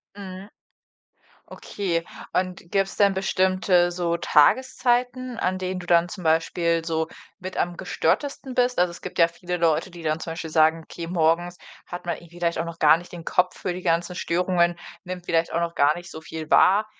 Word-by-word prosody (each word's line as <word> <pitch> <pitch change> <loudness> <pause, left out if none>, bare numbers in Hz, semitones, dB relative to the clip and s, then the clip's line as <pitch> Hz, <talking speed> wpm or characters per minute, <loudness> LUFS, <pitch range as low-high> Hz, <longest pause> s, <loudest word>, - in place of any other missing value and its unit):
Mhm. 195 0 -9 1.0
Okay, 170 -5 -3 0.3
und 180 -2 -2
gibt's 195 -1 0
denn 200 -2 +4
bestimmte, 185 -2 +2
so, 170 -1 -1
Tageszeiten, 250 - +2
an 185 0 0
denen 185 0 -3
du 175 - -9
dann 175 0 +3
zum 185 - -7
Beispiel 165 +1 +1
so 160 -1 -1 0.3
mit 185 0 -7
am 175 0 -1
gestörtesten 265 - -1
bist? 250 -2 +1
Also, 180 -1 +3
es 170 - -11
gibt 185 - -8
ja 170 0 +6
viele 175 +1 -5
Leute, 170 +2 +1
die 170 -1 -11
dann 155 0 -1
zum 165 - -5
Beispiel 165 -1 -6
sagen: 160 +1 +3
„Okay, 170 -1 -7
morgens 175 +1 +1 0.3
hat 175 0 -7
man 170 -1 -2
eben 170 - -15
vielleicht 170 -1 -2
auch 165 - -1
noch 165 0 -8
gar 155 +1 +6
nicht 175 - -13
den 170 -1 -8
Kopf 180 0 +1
für 180 - -2
die 180 - -6
ganzen 170 +1 0
Störungen, 175 0 +1 0.3
nimmt 180 -1 -6
vielleicht 165 -1 +1
auch 170 - +1
noch 170 0 -2
gar 145 +2 +4
nicht 175 0 -9
so 160 - -8
viel 160 -1 -8
wahr, 205 +3 +5
175 Hz, 195 wpm, -24 LUFS, 165-185 Hz, 1.0 s, ja